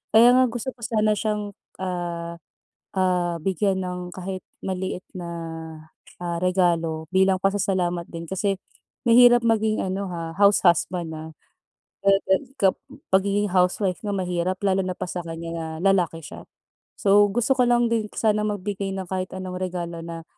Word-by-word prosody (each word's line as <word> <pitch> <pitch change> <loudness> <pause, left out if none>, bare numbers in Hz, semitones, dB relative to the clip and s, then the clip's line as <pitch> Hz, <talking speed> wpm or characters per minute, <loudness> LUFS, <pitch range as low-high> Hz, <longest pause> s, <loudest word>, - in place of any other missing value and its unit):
Kaya 235 +2 +8
nga 255 0 +5
gusto 240 +2 -4
ko - - -34
sana 215 -1 +1
siyang, 210 -1 -2 0.3
ah, 170 -2 -4 0.6
ah, 180 -2 +1
bigyan 190 +1 +1
ng 180 0 -4 0.2
kahit 185 0 -5 0.2
maliit 190 -1 -3
na, 175 -2 -5 0.9
ah, 175 -1 -2
regalo 170 -3 +1
bilang 190 0 +4
pasasalamat 185 -3 0
din 165 0 -7
kasi 195 +2 -1 0.5
mahirap 240 +1 +8
maging 220 -1 +2
ano, 190 +1 -3
ha, 165 -1 -5
house 200 0 +4
husband, 170 -1 +1
ah. 160 +1 -8 1.8
Pagiging 200 +2 +2
housewife 185 0 +2
nga 205 - -1
mahirap 180 0 -1
lalo 195 -1 +2
na 185 - -2
pa 185 - -3
sa 175 - -3
kanya 165 0 -6
na 165 -1 -4 0.3
lalaki 175 -3 0
siya. 145 - -10 0.5
So, 205 +1 +5
gusto 240 +3 +2
ko 250 - +4
lang 240 -1 +3
din 225 -2 +1
sana 215 -1 +2
magbigay 205 -1 -3
ng 190 -1 -5
kahit 185 0 -3
anong 185 -1 -5
regalo 175 -2 -4
na, 165 -1 -7
185 Hz, 145 wpm, -24 LUFS, 175-205 Hz, 1.8 s, Kaya